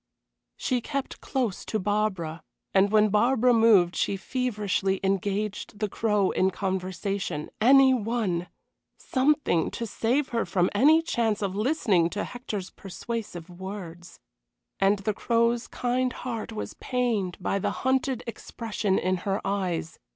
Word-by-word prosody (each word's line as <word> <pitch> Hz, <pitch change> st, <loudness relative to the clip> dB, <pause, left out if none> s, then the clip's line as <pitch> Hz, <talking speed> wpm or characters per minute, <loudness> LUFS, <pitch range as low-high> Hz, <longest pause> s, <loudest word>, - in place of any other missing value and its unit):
She 250 Hz, -1 st, 0 dB
kept 275 Hz, +2 st, -4 dB
close 245 Hz, -8 st, -2 dB
to 220 Hz, -, -1 dB
Barbara, 190 Hz, -6 st, -1 dB, 0.3 s
and 195 Hz, +1 st, +4 dB
when 215 Hz, 0 st, +5 dB
Barbara 240 Hz, +4 st, +3 dB
moved 215 Hz, -6 st, +5 dB
she 200 Hz, -, 0 dB
feverishly 205 Hz, -5 st, -1 dB
engaged 200 Hz, +2 st, -1 dB
the 210 Hz, 0 st, -1 dB
Crow 210 Hz, -2 st, +1 dB
in 185 Hz, -, +2 dB
conversation 190 Hz, -3 st, -3 dB
any 265 Hz, +2 st, +7 dB
one 215 Hz, -7 st, -1 dB, 0.5 s
something 265 Hz, -, +1 dB
to 235 Hz, -, -4 dB
save 245 Hz, +6 st, 0 dB
her 230 Hz, -1 st, 0 dB
from 180 Hz, -2 st, +1 dB
any 305 Hz, +9 st, +5 dB
chance 225 Hz, -9 st, 0 dB
of 195 Hz, -1 st, -2 dB
listening 210 Hz, -, +2 dB
to 205 Hz, +4 st, -3 dB
Hector's 215 Hz, -6 st, -6 dB
persuasive 195 Hz, -3 st, -6 dB
words. 180 Hz, -1 st, -9 dB, 0.6 s
And 195 Hz, +1 st, +4 dB
the 200 Hz, +2 st, -2 dB
Crow's 235 Hz, +2 st, +1 dB
kind 250 Hz, +1 st, -1 dB
heart 230 Hz, -3 st, -5 dB
was 215 Hz, -, -5 dB
pained 230 Hz, -8 st, -1 dB
by 195 Hz, +1 st, -1 dB
the -, -, 0 dB, 0.2 s
hunted 260 Hz, -1 st, +1 dB
expression 220 Hz, -3 st, -2 dB
in 185 Hz, +1 st, 0 dB
her 195 Hz, +2 st, -2 dB
eyes. 185 Hz, -5 st, -2 dB
210 Hz, 135 wpm, -26 LUFS, 190-240 Hz, 0.6 s, any